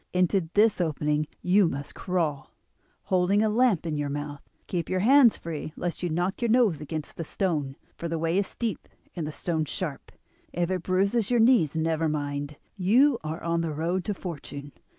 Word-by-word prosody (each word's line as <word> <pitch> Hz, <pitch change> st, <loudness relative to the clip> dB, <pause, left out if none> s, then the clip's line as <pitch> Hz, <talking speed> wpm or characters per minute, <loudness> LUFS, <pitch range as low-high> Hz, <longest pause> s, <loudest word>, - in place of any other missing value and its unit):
Into 180 Hz, -1 st, +2 dB
this 210 Hz, -2 st, +4 dB
opening 150 Hz, -2 st, 0 dB, 0.2 s
you 190 Hz, +1 st, +4 dB
must 140 Hz, 0 st, -6 dB
crawl, 160 Hz, -7 st, -2 dB, 0.5 s
holding 190 Hz, +3 st, +2 dB
a 220 Hz, -, +2 dB
lamp 220 Hz, -6 st, +2 dB
in 155 Hz, -2 st, -2 dB
your 145 Hz, -1 st, -2 dB
mouth. 145 Hz, 0 st, -5 dB, 0.2 s
Keep 170 Hz, -3 st, -3 dB
your 185 Hz, 0 st, 0 dB
hands 255 Hz, +1 st, +6 dB
free 155 Hz, -2 st, -6 dB
lest 175 Hz, -1 st, -4 dB
you 175 Hz, -, -1 dB
knock 175 Hz, +6 st, -1 dB
your 235 Hz, -, +1 dB
nose 220 Hz, -, +3 dB
against 155 Hz, +1 st, -6 dB
a -, -, -1 dB
stone, 150 Hz, -6 st, -2 dB, 0.2 s
for 170 Hz, -, -3 dB
the 165 Hz, -, -1 dB
way 165 Hz, +3 st, +1 dB
is 200 Hz, -, -1 dB
steep 230 Hz, -3 st, -4 dB, 0.3 s
and 165 Hz, -4 st, -3 dB
the -, -, -4 dB
stones 160 Hz, -1 st, -2 dB
sharp. 155 Hz, -7 st, -4 dB, 0.4 s
If 175 Hz, +1 st, -1 dB
it 185 Hz, -2 st, -1 dB
bruises 195 Hz, +5 st, +1 dB
your 245 Hz, -1 st, +3 dB
knees 225 Hz, -, +4 dB
never 160 Hz, 0 st, +1 dB
mind; 145 Hz, -1 st, -3 dB, 0.2 s
you 235 Hz, +8 st, +4 dB
are 155 Hz, +2 st, -5 dB
on 170 Hz, 0 st, 0 dB
the 165 Hz, -1 st, -2 dB
road 175 Hz, +4 st, -1 dB
to 205 Hz, -, -2 dB
fortune. 145 Hz, -5 st, -7 dB
170 Hz, 190 wpm, -27 LUFS, 155-195 Hz, 0.5 s, hands